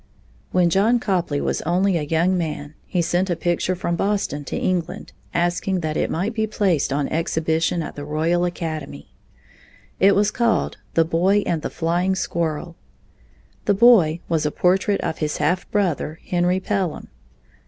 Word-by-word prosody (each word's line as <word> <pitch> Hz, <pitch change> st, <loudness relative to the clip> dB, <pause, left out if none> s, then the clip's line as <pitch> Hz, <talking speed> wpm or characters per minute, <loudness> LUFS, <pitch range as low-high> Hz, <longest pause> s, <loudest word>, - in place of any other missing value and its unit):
When 180 Hz, -2 st, +3 dB
John 220 Hz, +7 st, +3 dB
Copley 175 Hz, -9 st, -1 dB
was -, -, -1 dB
only 180 Hz, +3 st, +1 dB
a 165 Hz, -, 0 dB
young 165 Hz, +5 st, +1 dB
man, 155 Hz, -4 st, -3 dB
he 175 Hz, -2 st, 0 dB
sent 175 Hz, +3 st, 0 dB
a 175 Hz, -, +1 dB
picture 175 Hz, +2 st, 0 dB
from 170 Hz, -1 st, -2 dB
Boston 195 Hz, -6 st, -1 dB
to -, -, -4 dB
England, 180 Hz, -2 st, -2 dB, 0.2 s
asking 175 Hz, +2 st, 0 dB
that 155 Hz, -1 st, -2 dB
it -, -, 0 dB
might 195 Hz, +7 st, -1 dB
be 220 Hz, -1 st, 0 dB
placed 185 Hz, -10 st, +1 dB
on 140 Hz, 0 st, 0 dB
exhibition 160 Hz, +1 st, 0 dB
at -, -, -7 dB
the 145 Hz, -, -6 dB
Royal 160 Hz, +4 st, 0 dB
Academy. 155 Hz, -, -5 dB, 0.9 s
It 195 Hz, +1 st, +5 dB
was 205 Hz, +1 st, +2 dB
called 235 Hz, -2 st, 0 dB, 0.2 s
"The 165 Hz, -, +4 dB
Boy 185 Hz, +5 st, +2 dB
and 165 Hz, -3 st, -1 dB
the -, -, -3 dB
Flying 175 Hz, +3 st, 0 dB
Squirrel." 170 Hz, -2 st, -2 dB, 0.9 s
The 205 Hz, -, +3 dB
boy 190 Hz, -8 st, +5 dB
was 160 Hz, -2 st, 0 dB
a 150 Hz, -, +1 dB
portrait 190 Hz, +5 st, +1 dB
of 160 Hz, -, -3 dB
his 150 Hz, -1 st, -1 dB
half 170 Hz, +5 st, 0 dB
brother, 175 Hz, -6 st, -1 dB
Henry 180 Hz, +1 st, +1 dB
Pelham. 190 Hz, -4 st, -2 dB
175 Hz, 165 wpm, -22 LUFS, 160-190 Hz, 0.9 s, It